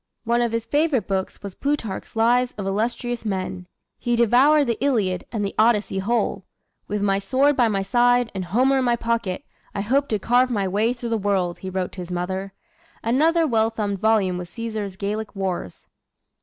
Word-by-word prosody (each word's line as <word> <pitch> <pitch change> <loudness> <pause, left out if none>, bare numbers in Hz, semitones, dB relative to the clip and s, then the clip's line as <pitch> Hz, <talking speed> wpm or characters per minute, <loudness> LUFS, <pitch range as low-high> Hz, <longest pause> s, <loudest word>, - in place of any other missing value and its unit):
One 235 +1 +1
of 235 -1 +1
his 230 0 -2
favorite 290 - +1
books 190 0 -3
was 200 -2 -6
Plutarch's 275 -9 -3
"Lives 245 +2 +2
of 200 - -4
Illustrious 235 +4 -2
Men." 185 -3 -3 0.3
He 240 0 0
devoured 260 +6 +5
the 235 +1 -2
"Iliad" 205 -10 +1
and 215 -3 -1
the 195 - -3
"Odyssey" 215 -3 +3
whole. 235 +5 0 0.4
"With 205 0 -2
my 195 -1 +2
sword 265 +9 +2
by 245 -3 +4
my 200 -3 0
side, 245 +2 +3
and 190 -2 -4
Homer 255 +9 +2
in - - +1
my 240 -1 +2
pocket, 230 -5 -2 0.3
I 200 - -1
hope 270 +7 +1
to 215 - 0
carve 245 +5 +3
my 205 -5 0
way 210 +5 +1
through 240 -1 -5
the 225 -1 0
world," 185 -4 0
he 190 - -6
wrote 185 -1 -2
to 185 - -8
his 180 0 -8
mother. 190 +2 -3 0.5
Another 320 +8 +3
well 225 -5 +2
thumbed 205 -3 -3
volume 200 -4 +2
was 175 -1 -7
Caesar's 215 -2 -5
"Gallic 210 +2 -4
Wars." 185 - -4
220 Hz, 190 wpm, -23 LUFS, 195-240 Hz, 0.5 s, devoured